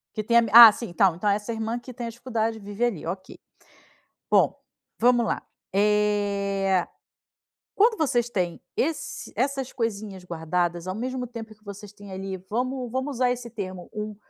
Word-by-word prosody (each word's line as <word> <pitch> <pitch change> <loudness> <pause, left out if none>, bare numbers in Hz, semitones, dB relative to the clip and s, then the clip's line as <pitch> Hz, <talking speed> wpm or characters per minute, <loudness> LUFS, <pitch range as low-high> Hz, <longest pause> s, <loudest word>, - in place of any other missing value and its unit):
Que 215 - -2
tem 235 +2 +3
a, - - +7 0.3
ah - - +6
sim 235 +2 -6
então 180 0 +3
então 205 +5 0
essa 210 +3 -1
irmã 225 +2 -3
que 255 +1 -11
tem 235 -1 -5
dificuldade 225 -2 -2
vive 205 +3 -5
ali, 225 -11 -1
ok. 185 +3 -6 0.9
Bom, - - +4 0.4
vamos 240 0 +4
lá - - -2 0.3
eh 200 -2 +1 0.9
quando 440 +2 +4
vocês 240 -6 +1
têm 180 -5 -2 0.2
esse 320 +3 -3
essas 270 -1 -1
coisinhas 205 -5 -4
guardadas 170 +1 -2
ao 185 - -3
mesmo 250 +3 -3
tempo 225 -2 -9
que 215 0 -31
vocês 205 0 -9
têm 205 -1 -12
ali, 190 0 -5
vamos 250 +2 -2
vamos 260 +2 -3
usar 250 0 +2
esse 245 -1 -4
termo, 185 -5 -7
um 215 -1 -5
215 Hz, 165 wpm, -25 LUFS, 195-240 Hz, 0.9 s, a